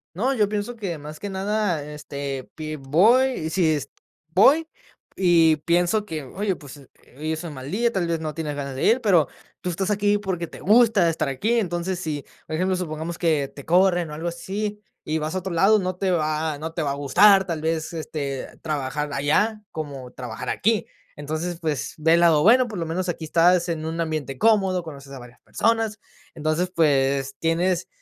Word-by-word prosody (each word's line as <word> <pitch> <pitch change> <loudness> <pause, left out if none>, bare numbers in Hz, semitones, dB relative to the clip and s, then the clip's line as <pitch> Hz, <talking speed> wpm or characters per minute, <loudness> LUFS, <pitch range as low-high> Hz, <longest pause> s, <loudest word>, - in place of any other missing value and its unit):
No, 240 +9 +1
yo 210 -4 +3
pienso 210 +3 -3
que 190 -8 -4
más 150 +1 -9
que 205 - -5
nada, 195 -4 -1
este, 140 -2 -5
pi 155 -1 -5
voy, 180 - +3
si 160 -2 +2
es 140 -2 -3 0.4
voy, 270 - +4 0.5
y 170 -4 +4
pienso 175 +5 +2
que, 160 -6 -5
oye, 190 +8 -2
pues, 145 -3 -12
eh, 140 -2 -16 0.3
hoy 155 +2 -3
es 160 +2 -5
un 165 -3 -6
mal 130 +1 -7
día, 235 +4 +1
tal 190 -5 -1
vez 165 -1 -1
no 155 -2 -5
tienes 155 -2 -3
ganas 140 -2 -5
de 130 - -3
ir, 240 +3 +4
pero, 180 - +4 0.3
tú 180 - -2
estás 190 +3 -2
aquí 205 0 +2
porque 185 -4 -3
te - - -12
gusta 215 -4 +4
estar 155 -3 -1
aquí, 200 - 0
entonces 180 -2 -2
si, 155 -5 -4 0.2
por 155 - -4
ejemplo, 185 +3 +1
supongamos 165 -1 -4
que 155 -5 +1
te 140 - -10
corren 175 -1 +3
o - - -6
algo 160 +3 -4
así, 200 +5 -4 0.2
y 155 - -1
vas 155 0 -3
a 185 - -1
otro 190 +1 -5
lado, 195 +6 +5
no 185 -1 -2
te 185 0 0
va 155 -2 0
no 160 +2 -5
te 165 - -2
va 140 - -1
a - - -1
gustar, 190 +8 +5
tal 165 -3 -3
vez, 160 0 -1
este, 145 -4 -5
trabajar 150 -1 -3
allá, 210 +11 +1
como 140 -5 -6
trabajar 120 -3 -6
aquí. 220 +1 +1 0.3
Entonces, 155 +4 -4
pues, 155 -5 -3
ve 160 +1 +3
el 170 - +5
lado, 165 -3 +5
bueno, 245 +4 +6
por 215 -4 -6
lo 170 - -2
menos 180 +3 -2
aquí 165 -2 -4
estás 175 +2 +3
en 160 -2 -2
un 165 +1 -4
ambiente 155 -5 -3
cómodo, 195 - +3
conoces 140 -4 -10
a 135 - -7
varias 125 0 -14
personas. 225 -2 0 0.4
Entonces, 155 +4 -1
pues, 140 -3 +2
tienes, 175 +2 0
165 Hz, 200 wpm, -23 LUFS, 150-190 Hz, 0.5 s, bueno